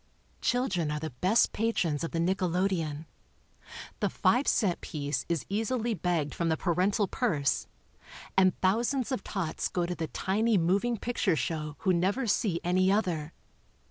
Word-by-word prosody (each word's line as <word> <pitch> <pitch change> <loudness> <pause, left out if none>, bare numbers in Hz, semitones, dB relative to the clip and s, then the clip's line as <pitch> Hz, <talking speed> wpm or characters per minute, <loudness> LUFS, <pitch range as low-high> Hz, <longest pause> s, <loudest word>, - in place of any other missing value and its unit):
Children 190 - 0
are 150 0 -2
the 160 0 -5
best 215 +6 +3
patrons 175 -9 0
of 165 - -2
the - - -4
nickelodeon. 175 -3 0 0.9
The - - +1
five 255 +4 +2
cent 190 -6 +2
piece 145 -1 -3
is 170 -4 -1
easily 225 +3 -1
begged 170 -5 -1
from 170 -1 -1
the 160 - +1
parental 190 +5 +1
purse, 165 - 0 0.7
and 185 -1 +5
thou 190 +5 +3
sands 260 +1 -1
of 255 -7 -2
tots 190 -6 -2
go 175 -1 -1
to 180 - -2
the 165 -2 -3
tiny 210 +6 +1
moving 195 +8 +1
picture 215 -6 0
show 150 +2 -3
who 190 -3 +2
never 195 +9 +1
see 200 -5 +1
any 185 +2 +3
other. 175 -7 0
185 Hz, 155 wpm, -29 LUFS, 165-215 Hz, 0.9 s, and